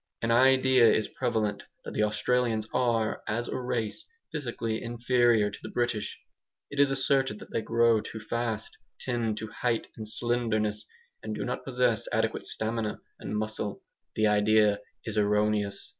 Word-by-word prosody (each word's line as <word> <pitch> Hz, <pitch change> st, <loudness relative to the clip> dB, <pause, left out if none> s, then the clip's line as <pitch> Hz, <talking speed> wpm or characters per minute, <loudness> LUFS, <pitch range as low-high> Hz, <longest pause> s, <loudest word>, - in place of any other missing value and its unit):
An 115 Hz, -, +1 dB
idea 130 Hz, -1 st, +6 dB
is 110 Hz, -, +1 dB
prevalent 110 Hz, -5 st, -1 dB, 0.2 s
that -, -, -6 dB
the -, -, 0 dB
Australians 110 Hz, +1 st, +1 dB
are, 115 Hz, -3 st, +1 dB
as 120 Hz, +2 st, -1 dB
a -, -, -3 dB
race, 120 Hz, -4 st, -3 dB, 0.2 s
physically 120 Hz, -7 st, -3 dB
inferior 120 Hz, -2 st, +2 dB
to -, -, -9 dB
the -, -, -7 dB
British. 120 Hz, -3 st, -2 dB, 0.5 s
It 145 Hz, -, -5 dB
is 140 Hz, -1 st, +6 dB
asserted 135 Hz, -3 st, +1 dB
that -, -, -12 dB
they -, -, 0 dB
grow 115 Hz, 0 st, +3 dB
too 110 Hz, -, -7 dB
fast, 110 Hz, 0 st, -3 dB, 0.2 s
tend 115 Hz, -4 st, -1 dB
to 110 Hz, +1 st, -4 dB
height 115 Hz, +1 st, -1 dB
and 110 Hz, -1 st, -6 dB
slenderness, 110 Hz, -2 st, -1 dB, 0.3 s
and 110 Hz, -1 st, -4 dB
do -, -, -3 dB
not 125 Hz, -, -3 dB
possess 125 Hz, -3 st, +1 dB
adequate -, -, 0 dB
stamina 110 Hz, -1 st, -2 dB, 0.2 s
and 105 Hz, -, -4 dB
muscle. 110 Hz, -1 st, -3 dB, 0.3 s
The 110 Hz, -, +2 dB
idea 105 Hz, 0 st, +4 dB, 0.3 s
is 110 Hz, -1 st, -1 dB
erroneous. 105 Hz, -1 st, +1 dB
115 Hz, 155 wpm, -28 LUFS, 105-120 Hz, 0.5 s, idea